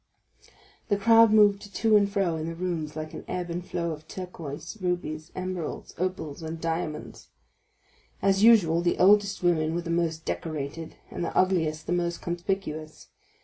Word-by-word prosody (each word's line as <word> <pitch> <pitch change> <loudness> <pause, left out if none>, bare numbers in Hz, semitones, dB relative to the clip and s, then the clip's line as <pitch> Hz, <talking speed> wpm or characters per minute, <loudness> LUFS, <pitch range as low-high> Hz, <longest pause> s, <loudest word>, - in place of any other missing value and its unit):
The 205 - +3
crowd 225 +1 +6
moved 205 -1 +4
to 220 -1 +3
and 200 -1 +4
fro 195 -5 +1
in 160 0 -4
the 165 - -4
rooms 165 -4 -3
like 155 0 -6
an - - -7
ebb 175 -1 -3
and 175 +1 -3
flow 170 -1 -3
of 155 0 -8
turquoises, 175 +1 -7
rubies, 170 -3 -3
emeralds, 185 -3 -4
opals, 170 -5 -3
and 160 0 -5
diamonds. 165 -1 -4 0.9
As 195 0 +2
usual, 195 -8 +6
the 175 0 +1
oldest 200 0 +4
women 165 -2 +2
were 175 - -1
the 170 - -4
most 165 -2 -1
decorated, 155 0 -4 0.2
and - - -4
the - - -3
ugliest 160 -4 +1
the 175 - -1
most 175 -1 -1
conspicuous. 170 -3 -4
175 Hz, 160 wpm, -27 LUFS, 160-190 Hz, 0.9 s, crowd